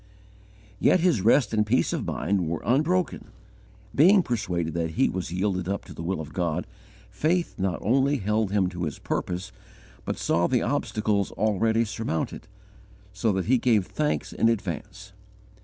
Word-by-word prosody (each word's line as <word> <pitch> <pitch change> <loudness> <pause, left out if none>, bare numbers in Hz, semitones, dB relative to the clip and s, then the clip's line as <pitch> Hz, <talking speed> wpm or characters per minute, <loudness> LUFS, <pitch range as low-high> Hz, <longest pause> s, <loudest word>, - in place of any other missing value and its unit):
Yet 185 - +4
his 165 - +3
rest 115 +1 +3
and 105 -1 +3
peace 110 +5 +1
of - - -3
mind 95 -4 -1
were 80 0 -3
unbroken. 155 +7 +1 0.7
Being 180 - +6
persuaded 90 - -2
that 85 -1 -1
he - - +3
was 90 -3 -4
yielded 90 -1 -1
up 100 - -3
to - - -10
the - - -8
will 90 +1 -2
of 75 -1 -7
God, 85 -4 -1 0.5
faith 170 +3 0
not 95 -2 0
only 135 +6 +2
held 105 -1 0
him 100 -3 +2
to 90 -1 -4
his 75 - -5
purpose, 90 +1 -3 0.5
but - - -3
saw 85 +1 +1
the 125 -3 +1
obstacles 105 -8 0
already 110 +2 +1
surmounted, 110 -7 -3 0.7
so 100 +3 +1
that 95 -1 -1
he 130 +1 +3
gave 115 -5 +3
thanks 150 +7 -2
in 115 - +3
advance. 95 -2 -4
105 Hz, 160 wpm, -26 LUFS, 90-120 Hz, 0.7 s, Being